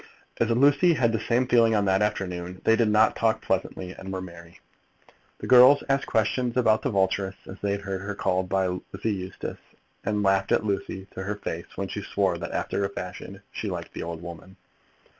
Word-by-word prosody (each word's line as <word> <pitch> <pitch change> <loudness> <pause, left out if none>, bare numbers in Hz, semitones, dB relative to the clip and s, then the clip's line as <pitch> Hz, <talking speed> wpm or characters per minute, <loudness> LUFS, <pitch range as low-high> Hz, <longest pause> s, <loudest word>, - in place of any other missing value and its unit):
As 115 - +2
Lucy 145 +8 +4
had 120 -5 +2
the 110 - 0
same 120 +3 +1
feelings 115 -2 +4
on 100 -1 +2
that 95 0 +2
afternoon, 90 -3 -2
they 115 - +5
did 115 -2 +2
talk 110 +1 +3
pleasantly 95 -1 -2
and 95 +1 -8
were 95 - -3
merry. 85 -2 -11 0.8
The - - -7
girls 130 +3 +7
asked 135 0 +1
questions 120 +3 0
about 110 -3 +3
the 140 - -1
Vulturess, 95 -2 0
as 95 - -10
they 100 -1 0
had 100 - -3
heard 95 -2 -4
her 100 +1 -5
called 95 -1 0
by 95 0 +1 0.3
Lizzie 105 +2 -2
Eustace, 95 -1 -6 0.4
and 105 -1 0
laughed 95 0 +2
at - - +2
Lucy 100 -1 -3
to - - -6
her 100 +2 -3
face 85 -4 -5
when 100 - -3
she 105 - -5
swore 95 -3 0
that, - - -5
after 100 - -2
a 100 - 0
fashion, 90 -2 -8
she - - -4
liked - - -6
the - - -6
old 85 0 -6
woman. 85 +2 -10
100 Hz, 200 wpm, -26 LUFS, 95-115 Hz, 0.8 s, girls